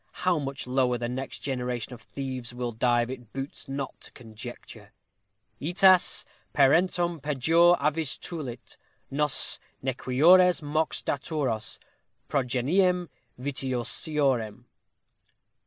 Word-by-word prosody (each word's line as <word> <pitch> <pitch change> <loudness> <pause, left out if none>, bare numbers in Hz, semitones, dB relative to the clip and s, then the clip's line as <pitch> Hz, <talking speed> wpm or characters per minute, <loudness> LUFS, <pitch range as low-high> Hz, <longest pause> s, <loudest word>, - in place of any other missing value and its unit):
How 180 -3 +3
much 140 -1 -5
lower 125 -1 +1
the 120 0 -3
next 130 +2 -5
generation 125 -3 -3
of 120 - -11
thieves 130 -1 -6
will 120 -1 -3
dive 120 +1 +1
it 125 -4 -9
boots 135 0 -7
not 135 0 -5
to - - -11
conjecture: 120 0 -10 0.7
Ætas 185 +4 +5 0.3
parentum 170 +4 +3
pejor 165 +5 +4
avis 155 -1 0
tulit, 130 -8 -7 0.3
Nos 150 0 +1 0.2
nequiores; 155 +8 +4
mox 155 +2 -1
daturos, 140 -6 -2 0.5
Progeniem 160 +8 +1 0.3
vitiosiorem. 130 -2 -1
135 Hz, 100 wpm, -27 LUFS, 125-160 Hz, 0.7 s, Ætas